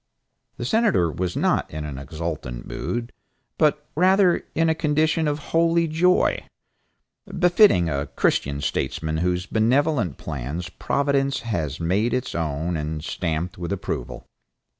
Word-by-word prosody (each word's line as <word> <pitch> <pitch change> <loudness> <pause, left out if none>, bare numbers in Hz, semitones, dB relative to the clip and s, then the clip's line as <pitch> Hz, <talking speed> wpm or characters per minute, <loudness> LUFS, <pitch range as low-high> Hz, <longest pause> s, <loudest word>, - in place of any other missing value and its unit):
The - - -4
Senator 215 - +2
was 90 +2 -3
not - - +1
in 75 0 -5
an 70 -3 -6
exultant 70 -4 -5
mood, 120 0 -4 0.5
but 150 -1 +2
rather 185 +2 +4
in 165 +1 +3
a 160 - +3
condition 155 +1 +1
of 145 0 0 0.2
holy 165 0 +3
joy, 175 +4 +2 0.9
befitting 180 - +5
a 70 -2 -2
Christian 70 +1 0
statesman 80 +2 -2
whose 90 +2 0
benevolent 115 - +1
plans 80 +4 -5
Providence 140 +5 0
has 85 - -3
made 100 +9 +1
its 125 0 -3
own 80 +1 -2
and 75 0 -4
stamped 85 +1 -3
with 85 0 -4
approval. 65 -9 -4
90 Hz, 130 wpm, -23 LUFS, -, 0.9 s, befitting